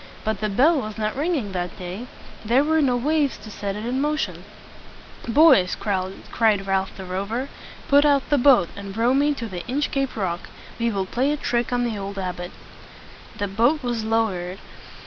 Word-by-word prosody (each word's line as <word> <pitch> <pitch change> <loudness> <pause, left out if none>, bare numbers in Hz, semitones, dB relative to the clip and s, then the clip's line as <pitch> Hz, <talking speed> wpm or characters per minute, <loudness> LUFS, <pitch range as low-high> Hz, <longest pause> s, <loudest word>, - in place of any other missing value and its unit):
But 220 -2 -1
the 215 - 0
bell 280 +10 +4
was 215 -1 -6
not 215 -1 -2
ringing 285 - -1
that 180 -1 -4
day. 185 +7 -6 0.4
There 240 +5 +3
were 315 +1 +2
no 255 -4 +2
waves 290 +2 +1
to 210 +1 -11
set 200 -1 -4
it 210 +2 -5
in 255 +3 -1
motion. 300 +1 -2 0.8
"Boys!" 240 - +5
cried 195 +2 0
Ralph 190 -1 -1
the 190 - -7
Rover; 200 +9 -3 0.4
"put 285 +1 +6
out 285 -2 +3
the 290 - +4
boat, 245 -9 +5
and 200 0 -8
row 235 +3 +3
me 290 +2 +2
to 235 - -5
the 180 -4 -6
Inchcape 275 0 -1
Rock. 185 -5 -3 0.3
We 235 0 +1
will 195 -3 -1
play 255 +8 0
a 300 - -1
trick 240 -3 -1
on 245 0 +1
the 225 -4 -2
old 200 0 -6
abbot." 180 -2 -4 0.9
The 205 - -1
boat 240 +10 +2
was 240 -3 -2
low 225 0 +2
ered. 180 0 -5
225 Hz, 185 wpm, -23 LUFS, 195-270 Hz, 0.9 s, put